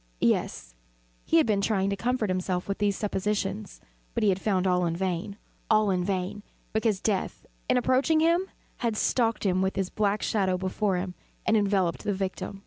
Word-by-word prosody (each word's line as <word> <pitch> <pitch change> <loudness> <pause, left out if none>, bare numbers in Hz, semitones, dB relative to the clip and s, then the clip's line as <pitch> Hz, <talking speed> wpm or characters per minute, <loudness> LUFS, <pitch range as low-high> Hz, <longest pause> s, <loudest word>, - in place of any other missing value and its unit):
Yes, - - 0 0.5
he - - +3
had 160 - +5
been 210 -3 +1
trying 200 -1 +1
to - - 0
comfort 230 -1 0
himself 185 -1 -1
with 200 - -3
these 205 -1 +1
suppositions: 205 0 -2 0.4
but 235 - 0
he 210 - +5
had 190 0 +1
found 190 -3 +1
all 180 -1 +2
in 165 - -1
vain. 185 +2 -2 0.3
All 215 -2 +4
in 180 -1 +1
vain; 190 +1 -2 0.3
because 220 -2 +1
Death, 200 -2 -2 0.2
in - - +4
approaching 265 +6 +3
him 340 +4 +2 0.3
had 230 -3 -1
stalked 230 -2 +1
with 190 0 +1
his 190 -1 -1
black 210 0 0
shadow 190 -4 +1
before 190 +1 0
him, 180 0 -3 0.3
and 225 - +3
enveloped 195 -5 +1
the 205 - 0
victim. 195 +1 -4
200 Hz, 180 wpm, -27 LUFS, 185-215 Hz, 0.5 s, had